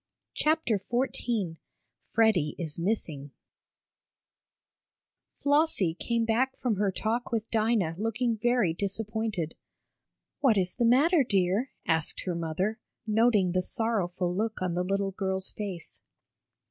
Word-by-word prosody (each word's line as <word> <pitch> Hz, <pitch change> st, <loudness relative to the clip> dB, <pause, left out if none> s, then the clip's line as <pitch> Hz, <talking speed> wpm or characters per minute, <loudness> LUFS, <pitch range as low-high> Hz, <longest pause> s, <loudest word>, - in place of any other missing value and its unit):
CHAPTER 305 Hz, -9 st, +1 dB
XIV 240 Hz, -7 st, -1 dB, 0.4 s
FREDDIE 215 Hz, -10 st, +2 dB
IS 165 Hz, -3 st, -4 dB
MISSING 165 Hz, -7 st, -1 dB, 2.1 s
Flossie 285 Hz, -, +2 dB
came 230 Hz, +6 st, -1 dB
back 245 Hz, +4 st, +1 dB
from 235 Hz, -6 st, -1 dB
her 200 Hz, -1 st, +1 dB
talk 225 Hz, +5 st, -2 dB
with 225 Hz, -1 st, -2 dB
Dinah, 220 Hz, -6 st, +2 dB
looking 225 Hz, +2 st, 0 dB
very 240 Hz, -5 st, +2 dB
disappointed. 205 Hz, -2 st, -2 dB, 0.9 s
"What 260 Hz, -7 st, +4 dB
is 185 Hz, -1 st, +1 dB
the 240 Hz, -, 0 dB
matter, 285 Hz, +7 st, +5 dB
dear?" 200 Hz, +2 st, +1 dB, 0.2 s
asked 160 Hz, -2 st, 0 dB
her 180 Hz, -, -1 dB
mother, 170 Hz, +7 st, -2 dB, 0.3 s
noting 215 Hz, -4 st, +3 dB
the 185 Hz, +1 st, +1 dB
sorrowful 180 Hz, -4 st, -1 dB
look 220 Hz, +2 st, -1 dB
on 185 Hz, -2 st, -1 dB
the 175 Hz, -, 0 dB
little 195 Hz, +1 st, 0 dB
girl's 190 Hz, -1 st, -2 dB
face. 195 Hz, -6 st, -6 dB
210 Hz, 120 wpm, -28 LUFS, 180-235 Hz, 2.1 s, matter